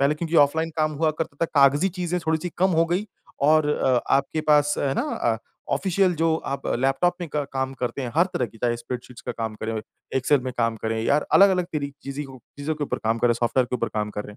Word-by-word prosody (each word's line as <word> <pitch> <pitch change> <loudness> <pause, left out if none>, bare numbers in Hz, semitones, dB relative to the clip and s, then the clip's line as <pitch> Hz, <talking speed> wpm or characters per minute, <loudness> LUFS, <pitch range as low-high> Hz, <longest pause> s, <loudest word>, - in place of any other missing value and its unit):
पहले 140 +2 +3
क्योंकि 165 +1 -4
ऑफ़लाइन 160 +3 +3
काम 155 -1 +1
हुआ 160 - +4
करता 150 -3 -3
था - - +5 0.2
कागज़ी 145 +7 +5
चीज़ें 180 0 -1
थोड़ी-सी 160 +2 0
कम 190 +1 +3
हो 165 - +5
गई 180 +5 -1 0.4
और 155 0 +4
अ, 130 -4 +2 0.2
आपके 140 +3 -1
पास 150 0 +4
है 135 -1 0
ना - - 0
अ, 115 -1 -1 0.4
ऑफ़िशियल 190 -1 +1
जो 160 0 +2
आप 140 - -3
लैपटॉप 135 +7 +2
में 170 - -4
क 145 -2 0
काम 130 0 -2
करते 125 +1 -3
हैं, 120 -2 -4
हर 170 +3 +5
तरह 125 -7 0
की 115 - -17
चाहे 120 +1 0
स्प्रेडशीट्स 125 +1 -7
का - - -2
काम 110 -2 -4
करें, 110 +1 -3 0.4
एक्सेल 135 +1 +3
में 130 0 -4
काम 115 -1 +1
करें 110 0 -1
यार 145 +1 +2
अलग-अलग 190 -2 +6
तरी 140 -2 -3
चीज़ी 140 +1 -5
हो 135 -1 -11 0.2
चीज़ों 155 +2 -2
के 150 -1 -3
ऊपर - - -3
काम 115 +1 +1
करें, 120 0 +3
सॉफ़्टवेयर 120 +2 +1
के 125 - -2
ऊपर - - -1
काम 105 -1 -1
कर 105 0 -5
रहें। 105 - -11
140 Hz, 240 wpm, -24 LUFS, 125-160 Hz, 0.4 s, अलग-अलग